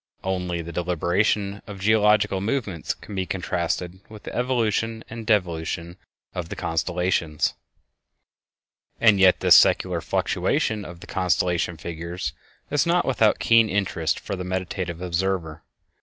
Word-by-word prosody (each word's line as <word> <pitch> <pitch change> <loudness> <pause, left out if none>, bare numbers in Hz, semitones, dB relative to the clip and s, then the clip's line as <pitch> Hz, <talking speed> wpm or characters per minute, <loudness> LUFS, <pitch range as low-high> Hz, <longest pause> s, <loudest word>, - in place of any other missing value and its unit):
Only 90 -2 -2
the 85 - -7
deliberation 90 +4 0
of 100 -2 -8
geological 105 -1 +3
movements 105 - -2
can - - -11
be 95 -1 -2
contrasted 90 0 -2
with 110 -1 -12
the - - -7
evolution 115 -2 0
and 115 -1 -7
devolution 85 -4 0 0.4
of 85 -2 -5
the - - -5
constellations. 85 -1 0 1.5
And 110 -4 +5
yet 95 -1 +5
this - - +6
secular - - +4
fluctuation 105 -2 0
of 85 0 -10
the - - -9
constellation 90 -2 0
figures 85 -2 -5 0.4
is 145 +2 +2
not 175 +1 +2
without 115 -5 +3
keen 115 -1 +4
interest 95 -5 0
for 100 - -5
the 90 - -5
meditative 90 -1 -3
observer. 90 -2 -2
95 Hz, 130 wpm, -24 LUFS, 85-105 Hz, 1.5 s, this